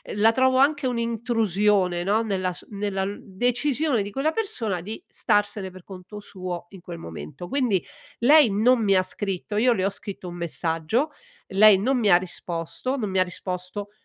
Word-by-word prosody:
La 215 +2 +5
trovo 260 +1 +3
anche 285 0 +3
un'intrusione, 215 -6 +1
no, 205 +4 +2
nella 190 -4 -1
su - - -11
nella 200 -1 -2
l 200 +1 -5
decisione 245 +5 0
di 200 - -6
quella 275 +7 0
persona 235 - -2
di 215 +6 -7
starsene 205 -2 0
per 185 -1 -13
conto 190 +3 -10
suo 180 -3 -7
in 195 - -12
quel 175 -1 -8
momento. 80 - -8
Quindi 245 -10 +1 0.4
lei 285 +1 +6
non 230 +5 +3
mi 195 -2 +3
ha 185 - +4
scritto, 200 +2 -4
io 245 +3 +4
le 190 -5 -1
ho - - +2
scritto 195 -2 -7
un 175 - -8
messaggio, 170 - -1 0.4
lei 205 +1 +7
non 255 +5 +1
mi 215 -3 +2
ha - - +8
risposto, 175 +6 -4
non 215 -6 -2
mi 190 0 0
ha - - +5
risposto, 180 +2 -5
205 Hz, 180 wpm, -24 LUFS, 185-235 Hz, 0.4 s, ha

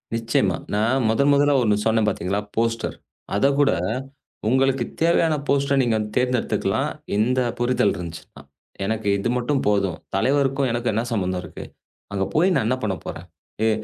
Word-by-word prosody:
நிச்சயமா 115 -6 +1 0.2
நான் 120 +5 +2
முதன்முதலா 140 +4 +3
ஒண்ணு 105 -2 +3
சொன்னேன் 110 -1 +2
பாத்தீங்களா? 100 0 -1 0.2
போஸ்டர் 115 0 -1 0.4
அத 120 - +2
கூட 145 - +4 0.8
உங்களுக்குத் 130 -1 +1
தேவையான 165 -1 +3
போஸ்டர 140 0 +2
நீங்கத் 110 -3 +1
தேர்ந்தெடுத்துக்கலாம், 125 -1 0 0.3
இந்த 120 +5 +2 0.2
புரிதல் 120 -4 +2
இருந்துச்சுன்னா. 85 -6 -9 0.4
எனக்கு 110 0 -2
இது 110 +4 -1
மட்டும் 135 +3 0
போதும் 100 -4 +1 0.2
தலைவருக்கும் 135 +3 +1
எனக்கும் 120 +1 -1
என்ன 115 - 0
சம்பந்தம் 95 -4 -1
இருக்கு? 80 - -9 0.5
அங்க 95 -1 0
போய் 180 +4 +4
நான் - - +1
என்ன 130 - +1
பண்ண 100 -3 0
போறேன்? - - -7 0.4
ஏ 110 - +4
115 Hz, 145 wpm, -23 LUFS, 105-135 Hz, 0.8 s, கூட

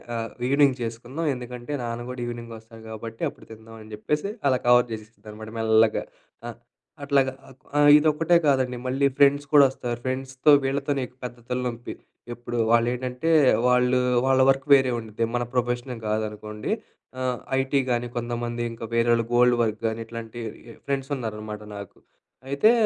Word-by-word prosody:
ఆహ్, 115 0 -3 0.2
ఈవినింగ్ 140 0 +4
చేసుకుందాం 120 +8 -4
ఎందుకంటే 125 +2 -8
నాన్న 115 0 -4
గూడా 125 -1 -6
ఈవినింగ్ 120 -1 -6
వస్తాడు 110 0 -15
కాబట్టి 115 +1 -8
అప్పుడు - - -17
తిందాం" 110 0 -12
అని 110 - -13
చెప్పేసి 150 - -2 0.2
అలా 130 - +2
కవర్ 120 0 +5
చేసేసింది 110 0 -11
అనమాట 110 +1 -9
మెల్లగా. 110 0 +3 0.4
అ! - - -4 0.5
అట్లాగా 135 -2 +2 0.5
ఆహ్, 145 0 +6
ఇదొక్కటే 155 +3 +2
కాదండి 130 -3 +1
మళ్ళీ 135 +2 +2
ఫ్రెండ్స్ 145 0 +4
కూడా 145 -2 +8
వస్తారు, 120 -2 -4
ఫ్రెండ్స్‌తో 130 +2 +1
వీళ్ళతోనే 140 +1 -1
ఎక్కువ 125 +1 -19
పెద్ద 120 0 -7
తల 125 - -1
నొప్పి. 120 0 -6 0.4
ఎప్పుడు 120 0 -6
వాళ్ళేంటంటే, 125 +5 +1 0.4
వాళ్ళు 125 0 +3 0.3
వాళ్ళ 135 0 +3
వర్క్ 135 0 +2
వేరే 130 -2 +5
ఉండుద్ది. 110 0 -3
మన 120 - 0
ప్రొఫెషన్ 120 0 -1
గాదనుకోండి. 105 0 -3 0.5
ఆహ్, 125 -1 -1 0.2
ఐటీ 135 +1 +1
గానీ, 120 0 0
కొంతమంది 120 0 -3
ఇంకా 115 0 -7
వేరొళ్ళు 115 0 +3
గోల్డ్ 125 0 +5
వర్క్ 110 -1 -1
కానీ 110 +1 -3
ఇట్లాంటి 115 0 -8 0.5
ఫ్రెండ్స్ 135 0 -2
ఉన్నారనమాట 105 -3 -6
నాకు. 100 -2 -9 0.5
అయితే, 140 +11 +4
120 Hz, 150 wpm, -25 LUFS, 115-135 Hz, 0.5 s, కూడా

